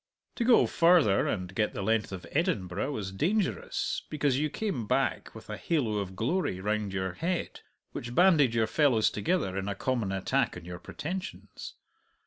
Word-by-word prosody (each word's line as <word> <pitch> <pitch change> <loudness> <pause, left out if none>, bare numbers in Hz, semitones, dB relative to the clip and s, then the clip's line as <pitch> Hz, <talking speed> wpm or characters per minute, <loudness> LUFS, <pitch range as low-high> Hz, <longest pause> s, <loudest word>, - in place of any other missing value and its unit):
To 240 - +1
go 240 0 +6
farther, 165 - +4
and 90 -2 -3
get 105 +2 0
the 100 - -3
length 110 0 +1
of 95 -2 -7
Edinburgh, 140 - -1
was 100 -8 -4
dangerous, 160 - -1
because 145 -3 +1
you 155 +1 0
came 165 - -3
back - - 0
with - - -11
a - - -5
halo 120 -11 0
of 95 -2 -5
glory 120 - -1
round 105 +1 -1
your 95 -1 -2
head 175 - -3 0.3
which 120 +1 -6
banded 155 -9 +5
your 115 -1 +3
fellows 120 -3 +3
together 105 - -1
in 95 0 -3
a 100 - -2
common 115 -3 -1
attack 95 -1 0
on 85 - -10
your 90 0 -7
pretensions. 185 - -7
115 Hz, 170 wpm, -29 LUFS, 95-165 Hz, 0.3 s, go